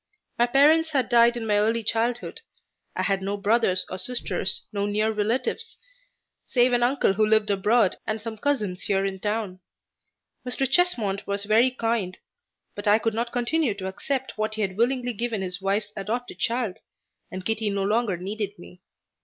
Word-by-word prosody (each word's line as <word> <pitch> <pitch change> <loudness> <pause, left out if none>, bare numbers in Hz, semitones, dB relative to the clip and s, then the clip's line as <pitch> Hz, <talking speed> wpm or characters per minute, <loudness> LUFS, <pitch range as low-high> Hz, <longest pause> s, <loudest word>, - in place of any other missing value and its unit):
My 240 - +4
parents 305 +5 +4
had 260 -5 +1
died 235 0 +5
in 230 - -4
my 210 -1 +2
early 225 +2 +1
childhood. 235 - -1 0.5
I - - -1
had 195 -1 0
no 200 +1 -2
brothers 200 -2 +2
or 185 - -5
sisters, 195 -7 +1
no 200 0 -1
near 215 +2 +1
relatives, 220 +4 -2 0.7
save 245 0 +3
an 240 - +2
uncle 245 -4 +2
who 215 +2 +1
lived 215 -1 +3
abroad 205 +1 +2
and 220 0 -2
some 225 +1 -6
cousins 210 -10 -1
here 195 -1 +1
in 190 -1 -3
town. 205 -2 -3 0.8
Mr. 255 +2 -1
Chesmond 235 - +1
was 200 0 +1
very 220 +5 +4
kind, 225 -7 -2 0.6
but 205 - -6
I 205 +1 +6
could 225 0 -1
not 235 +2 -2
continue 245 -1 0
to 190 -2 -5
accept 260 +6 -4
what 215 0 -1
he 220 - -1
had 190 -2 -3
willingly 245 +2 0
given 225 -2 -2
his 180 0 -2
wife's 205 +2 -1
adopted 230 +5 -4
child, 230 -5 -1 0.5
and 185 0 -7
Kitty 220 -1 0
no 200 -1 -1
longer 210 -1 0
needed 200 +2 -4
me. 180 +1 -14
220 Hz, 175 wpm, -25 LUFS, 200-240 Hz, 0.8 s, I